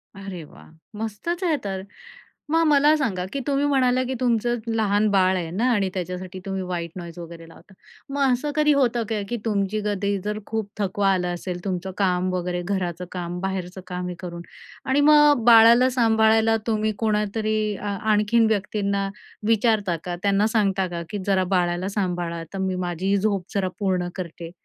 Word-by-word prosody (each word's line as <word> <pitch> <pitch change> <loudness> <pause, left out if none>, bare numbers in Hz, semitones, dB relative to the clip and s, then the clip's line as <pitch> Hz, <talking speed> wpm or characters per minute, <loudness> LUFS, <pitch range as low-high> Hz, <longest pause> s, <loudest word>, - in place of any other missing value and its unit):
अरे 195 -3 -7
वाह! 150 - -16 0.3
मस्तच 225 - -4
आहे 335 -4 +2
तर! 195 -2 -3 0.7
मग 330 +1 +4
मला 295 +1 +5
सांगा, 200 -11 -1
की 280 - -2
तुम्ही 280 0 +1
म्हणाला 255 -3 +2
की 265 - -2
तुमचं 240 -1 +1 0.2
लहान 210 -1 +2
बाळ 190 -1 +3
आहे 170 -2 -3
ना 205 +8 0
आणि 200 -4 +1
त्याच्यासाठी 185 0 -5
तुम्ही 195 -1 -3
व्हाईट 175 -2 -4
नॉईज 170 -2 -8
वगैरे 165 -1 -9
लावता; 190 - -17 0.4
मग 280 +1 -2
असं 290 +4 -2
कधी 300 -1 +4
होतं 245 -4 +2
का, 215 -2 -1
की 240 - -2
तुमची 210 -1 0
कधी 200 -1 0
जर 210 0 -2
खूप 220 -2 -3
थकवा 195 0 +1
आला 180 -1 -1
असेल 175 0 -5
तुमचं 190 -1 -3
काम 185 -2 +1
वगैरे 180 0 -2
घराचं 180 -2 -2
काम 175 -1 -4
बाहेरचं 190 -1 -4
काम 180 -1 -4
हे 180 - -5
करून 170 -1 -7 0.5
आणि 275 +2 +3
मग 295 -4 +6
बाळाला 235 +2 +7
सांभाळायला 225 -2 +3
तुम्ही 215 -1 +1
कोणातरी 215 0 0 0.2
अ, 210 - -8
आणखीन 215 +2 +2
व्यक्तींना 200 -1 -1 0.4
विचारता 220 -5 +2
का 175 -1 -4
त्यांना 200 +1 +3
सांगता 195 -4 +1
का 170 -1 -5
की 210 - -4
"जरा 190 -2 +3
बाळाला 175 +1 0
सांभाळा. 175 -4 -2
आता 165 +4 -8
मी 185 - -1
माझीही 185 +3 0
झोप 200 -2 0
जरा 190 -2 +1
पूर्ण 185 -3 0
करते." 170 -2 -7
200 Hz, 175 wpm, -23 LUFS, 180-225 Hz, 0.7 s, बाळाला